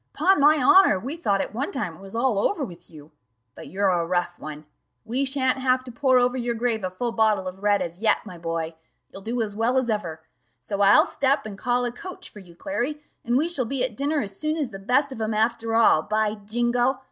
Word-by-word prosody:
'Pon 375 +3 +3
my 300 +2 +6
honour, 380 - +6
we 265 +10 -5
thought 200 - 0
at - - -5
one 260 +6 -2
time 185 -11 -3
it - - -16
was 195 +2 -10
all 235 -3 +1
over 310 - 0
with 175 -3 -13
you 155 -1 -14 0.4
but - - -11
you're 200 +1 0
a 175 -2 +1
rough 175 0 -2
one: 150 0 -8 0.4
we 250 +5 0
shan't 260 -1 +1
have 255 0 +1
to 255 - -8
'pour 260 +2 +2
over 250 0 +2
your 240 -2 -2
grave 230 -2 -1
a 185 - -1
full 235 +6 -3
bottle 215 -4 +1
of 185 +1 -8
red' 205 -1 +2
as 170 +1 -7
yet, 220 - +2
my 180 - -9
boy 165 -1 -4 0.4
you'll 195 - -10
do 230 +4 -3
as 205 -2 -6
well 230 +4 +1
as 250 -3 +1
ever. 165 -7 -4 0.4
So 195 - -4
I'll 200 0 +6
step 275 +1 0
and 210 -2 -6
call 245 +4 0
a 240 - -2
coach 370 +9 -10
for 210 - -12
you, 175 -3 -15
Clary, 290 - -3 0.2
and 240 +2 +1
we 310 +5 +1
shall 290 -8 -1
be 255 +2 -1
at 250 -4 -2
dinner 290 +4 0
as 195 -1 -7
soon 310 +1 -1
as 285 -6 -2
the 195 - -8
best 255 +8 +1
of 225 - -7
'em 215 0 -1
after 225 +1 0
all, 225 -8 +5
by 215 +2 0
jingo! 240 +5 0
230 Hz, 240 wpm, -24 LUFS, 195-260 Hz, 0.4 s, my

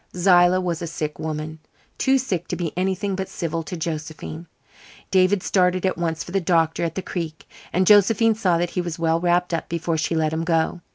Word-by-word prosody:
Zillah 180 0 +5
was 175 -2 -2
a 170 - -3
sick 155 -2 -4
woman 155 0 -4 0.4
too 270 0 +3
sick 190 -10 -2
to - - -3
be 170 -4 -3
anything 190 +2 -1
but 190 0 -4
civil 165 -2 -3
to 175 +2 -6
Josephine. 160 0 -5 0.6
David 185 0 +3
started 185 -1 +2
at 185 - +1
once 165 -1 -2
for - - -10
the 195 +1 0
doctor 165 -2 +1
at 165 -1 -2
the 190 - -3
Creek, 165 -4 -5 0.2
and 185 +2 +2
Josephine 210 +3 +5
saw 190 -6 +1
that 175 0 -1
he 180 - -1
was 175 -2 -5
well 165 0 +1
wrapped 175 0 +1
up 165 - -2
before 165 -1 -1
she 160 +2 -1
let 155 -1 +1
him 160 +1 -1
go. 165 +1 0
175 Hz, 210 wpm, -23 LUFS, 165-185 Hz, 0.6 s, Zillah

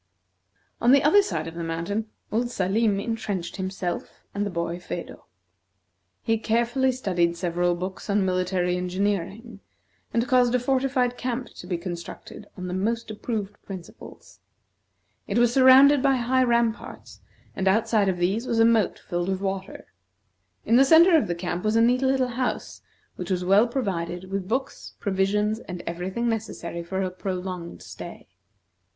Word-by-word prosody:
On 240 +2 +5
the 280 - +5
other 360 +8 +6
side 165 - -3
of 165 - -7
the 170 0 -5
mountain, 170 +7 -3 0.2
old 240 +3 0
Salim 200 0 +1
intrenched 200 -5 -3
himself 190 -2 -4
and 200 - -1
the - - -3
boy, 170 -1 -3
Phedo. 180 - -7 1.0
He 225 -1 +1
carefully 240 +4 +1
studied 175 -9 0
several 175 0 0
books 185 +4 -6
on 200 -1 +2
military 180 -1 0
engineering, 200 +4 -2 0.5
and 235 +1 0
caused 250 -2 +3
a - - +3
fortified 255 -1 0
camp 250 0 -3
to 180 - -12
be 175 -2 -1
constructed 175 +3 -8
on 180 - -5
the 180 - -4
most 225 +4 -1
approved 210 -2 -4
principles. 185 -3 -11 0.9
It 200 - -1
was 240 0 +4
surrounded 270 +2 +7
by 270 0 +3
high 255 +1 +2
ramparts, 235 -2 -1 0.3
and 190 - -1
outside 215 0 +3
of 185 - -1
these 195 +8 0
was 230 - 0
a 225 - +6
moat 225 -3 +3
filled 175 +1 -3
with 190 -1 -1
water. 195 -1 -4 0.8
In 230 - +4
the 270 - +7
centre 330 +5 +7
of 315 - +3
the 175 - -2
camp 175 0 -4
was 215 +1 +1
a 225 - +5
neat 245 +2 +3
little 265 -1 +2
house 250 +1 -3 0.4
which 180 - -6
was 180 -1 -1
well 200 +5 +5
provided 185 -7 -3
with 195 -1 -3
books, 265 +5 -3
provisions, 210 +2 0
and 180 -6 -8
every 175 +2 -4
thing 235 +5 -2
necessary 210 -7 -3
for 190 +3 -3
a 185 - -2
prolonged 185 -2 -5
stay. - - -10
205 Hz, 160 wpm, -25 LUFS, 180-240 Hz, 1.0 s, surrounded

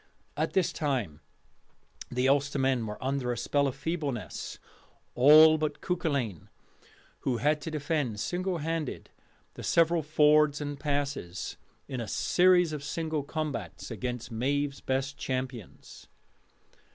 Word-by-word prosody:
At - - -1
this 190 -3 +2
time 125 - -2 0.9
the 125 +1 +1
Ulstermen 135 -3 +1
were 105 - -5
under 130 -2 -1
a 120 - -3
spell 140 +4 +1
of 135 - -3
feebleness, 140 - -4 0.6
all 155 +5 +8
but 155 -1 -2
Cuculainn, 140 - -2 0.7
who 125 -3 -1
had 150 +6 +1
to 150 - -5
defend 145 -7 -2
single 180 - -1
handed 160 -2 -3 0.4
the - - -9
several 165 0 +3
fords 150 -1 +4
and 145 -1 -5
passes, 140 - -3 0.3
in 130 -4 -4
a 115 - -5
series 180 +1 +3
of 145 -2 -5
single 155 +1 -2
combats, 140 - -5
against 125 -1 -4
Maive's 140 +4 -1
best 135 +1 -2
champions. 130 -5 -5
140 Hz, 125 wpm, -29 LUFS, 125-155 Hz, 0.9 s, all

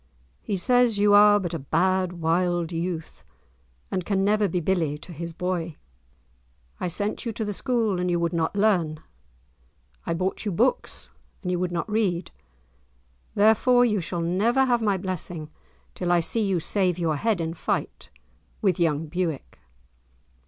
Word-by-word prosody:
He 200 - -2
says 245 +2 +3
you 205 0 +4
are 205 0 +7
but 175 -3 -4
a 165 - -2
bad, 185 +5 +1
wild 175 0 0
youth, 165 -1 -4 0.7
and 185 -1 -1
can 195 +1 0
never 210 0 +3
be 180 0 -1
billie 165 -4 0
to 175 +4 -11
his 170 +2 -6
boy. 170 -2 -3 1.0
I - - -2
sent 205 +5 -2
you 235 - -2
to 220 - -3
the 205 - -3
school, 225 -4 0
and 180 0 0
you 175 -1 +1
would 170 +1 -1
not 165 +2 -1
learn. 180 -7 +1 1.1
I 165 - 0
bought 185 +3 -2
you 210 - -2
books, 485 - 0 0.3
and 180 - -2
you 180 - 0
would 180 0 -1
not 170 +4 -2
read; 200 -5 -1 1.0
therefore 225 +4 +5
you 210 -5 +1
shall 170 +1 -4
never 215 +10 +2
have 240 -2 +2
my 205 -3 +1
blessing 175 -4 -5 0.4
till 175 -1 -2
I 175 - +4
see 225 +7 0
you 195 -4 +1
save 180 +1 +1
your 160 -4 0
head 220 +2 0
in 165 0 -2
fight 165 - -3 0.5
with 190 -5 +1
young 160 -2 +1
Bewick." 165 -2 -4
180 Hz, 165 wpm, -25 LUFS, 170-205 Hz, 1.1 s, are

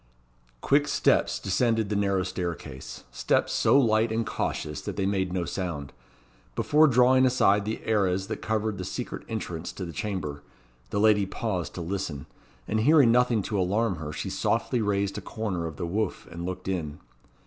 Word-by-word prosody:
Quick 145 +1 +3
steps - - +2
descended 110 +2 +1
the 105 - -1
narrow 100 -2 +1
staircase 85 -7 -5
steps - - +1
so 140 - +4
light 110 -2 +3
and 115 +1 0
cautious 75 -6 -3
that - - -5
they 95 - -1
made 95 -2 0
no 90 -1 -1
sound. 80 -8 -4 0.6
Before 155 +1 +4
drawing 130 0 +5
aside 105 -6 +3
the 110 +1 -4
arras 95 -4 +1
that 110 +1 -5
covered 110 -2 -1
the - - -3
secret - - -5
entrance 90 -7 -4
to 95 - -5
the 85 - -7
chamber, 80 -9 -4 0.5
the 100 - -1
lady 105 -2 +4
paused 95 -4 -3
to 90 - -4
listen; 85 -6 -4 0.4
and 110 - 0
hearing 140 0 +6
nothing 120 -3 +3
to 105 0 -2
alarm 95 +1 +1
her, 75 -1 -5
she - - -4
softly 125 - 0
raised 100 -1 0
a - - -10
corner 95 -7 -3
of 80 - -7
the - - -3
woof 100 +3 -2
and 85 +1 -5
looked 90 0 -5
in. 80 -6 -2
100 Hz, 175 wpm, -27 LUFS, 90-110 Hz, 0.6 s, hearing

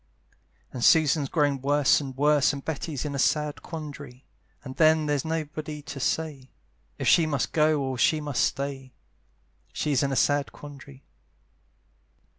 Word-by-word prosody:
And 125 - -5
Susan's 150 -3 +4
growing 145 -4 +1
worse 145 +1 +3
and 135 -2 -8
worse, 145 0 +3
And 140 -1 -7
Betty's 150 -3 -4
in 145 - -3
a 140 - -3
sad 150 +1 0
quandary; 145 -5 -9 0.4
And 130 -2 -8
then 155 -1 +4
there's 145 -2 0
nobody 155 -1 -5
to 140 -1 -8
say 140 -2 -2 0.5
If - - -3
she 165 -2 +5
must 140 -4 -1
go 155 -1 +2
or 130 -2 -3
she 155 - +3
must 145 -3 -1
stay: 135 -1 -3 0.8
She's 145 -5 0
in 140 - 0
a - - -1
sad 145 -3 +1
quandary. 140 -2 -13
145 Hz, 150 wpm, -26 LUFS, 135-155 Hz, 0.8 s, she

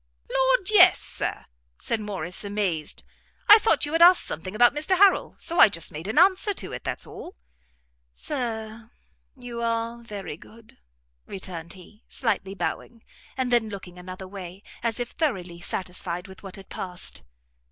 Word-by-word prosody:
"Lord, - - +2
yes, 365 -3 +7
Sir," - - +1 0.3
said 230 - -1
Morrice, 190 -4 -4
amazed; 200 -6 -3 0.4
"I 425 +1 +10
thought 435 -7 +2
you 290 - -5
had 330 +1 +1
asked 355 +1 +8
something 185 +6 -5
about 240 +2 +5
Mr 310 +6 +1
Harrel, 395 0 +4
so 335 - -2
I - - +9
just 165 -5 0
made 160 +5 -7
an 215 - -3
answer 390 +2 +4
to 190 - -6
it; - - -6
that's - - -4
all." - - -10 0.8
"Sir, 225 - -5 0.5
you 245 -2 -7
are 230 0 -2
very 205 -9 -7
good," 225 +5 -17 0.5
returned 170 -4 -6
he, 195 +4 -16
slightly 200 -5 -1
bowing, 230 +3 -5 0.3
and 255 -1 -1
then 235 -3 +3
looking 185 -3 -9
another 185 +1 -9
way, 190 0 -9 0.2
as 230 0 -1
if 245 0 -4
thoroughly 185 - -2
satisfied 180 0 -5
with 190 0 -13
what 195 -1 -9
had 195 -2 -12
passed. 180 - -7
215 Hz, 160 wpm, -25 LUFS, 185-250 Hz, 0.8 s, I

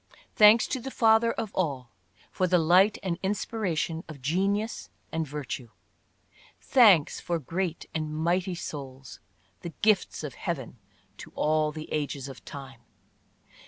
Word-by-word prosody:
Thanks 215 +2 +7
to 260 - -1
the 270 - -6
Father 225 -2 +4
of 225 -3 -5
all 135 -9 -2 0.4
for 185 - 0
the 180 0 +4
light 180 +5 +4
and 175 -3 -3
inspiratio7i 190 -5 -2
of 155 -3 -9
genius 195 - -1 0.2
and 160 -1 -2
virtue! 140 -4 -6 0.9
Thanks 210 - +5
for 170 -1 -2
great 170 +3 -3
and 155 -1 -3
mighty 175 +4 0
souls, 135 -5 -8 0.4
the 170 -2 -8
gifts 215 -2 +2
of - - -5
Heaven - - -5 0.4
to - - -11
all 155 0 +1
the 155 0 -8
ages 145 -3 -3
of 135 -2 -11
time 135 -3 -10
170 Hz, 135 wpm, -27 LUFS, 150-200 Hz, 0.9 s, Thanks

